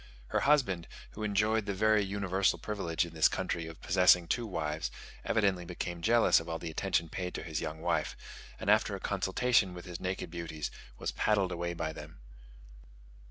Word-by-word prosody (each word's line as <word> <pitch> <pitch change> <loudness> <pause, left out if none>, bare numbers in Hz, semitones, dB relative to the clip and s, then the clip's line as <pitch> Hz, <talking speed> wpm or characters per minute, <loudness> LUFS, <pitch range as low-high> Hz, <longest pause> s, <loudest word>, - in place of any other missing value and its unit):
Her - - +1
husband, 125 - +2 0.2
who 110 - -9
enjoyed 105 +1 +1
the 100 - -1
very 110 +1 +4
universal 95 -1 +1
privilege 85 -6 -1
in 85 - -10
this 80 -1 +5
country 85 -1 -2
of 80 -1 -11
possessing 90 -1 +5
two 120 +6 -1
wives, 80 -5 -2 0.3
evidently 100 -5 +1
became 85 0 -5
jealous 115 +4 +5
of 80 - -8
all 80 - -2
the 80 -1 -6
attention 85 +1 0
paid 90 +2 -4
to - - -4
his 80 -2 -3
young 80 0 -5
wife; 85 0 0 0.4
and, - - -6
after - - +4
a - - -6
consultation 100 -2 +1
with 90 - -9
his 90 -2 -6
naked 90 -2 -3
beauties, 80 -3 -4 0.3
was - - -2
paddled 100 -4 +1
away 85 0 -3
by 80 -1 -3
them. - - -10
90 Hz, 180 wpm, -31 LUFS, 85-100 Hz, 0.4 s, this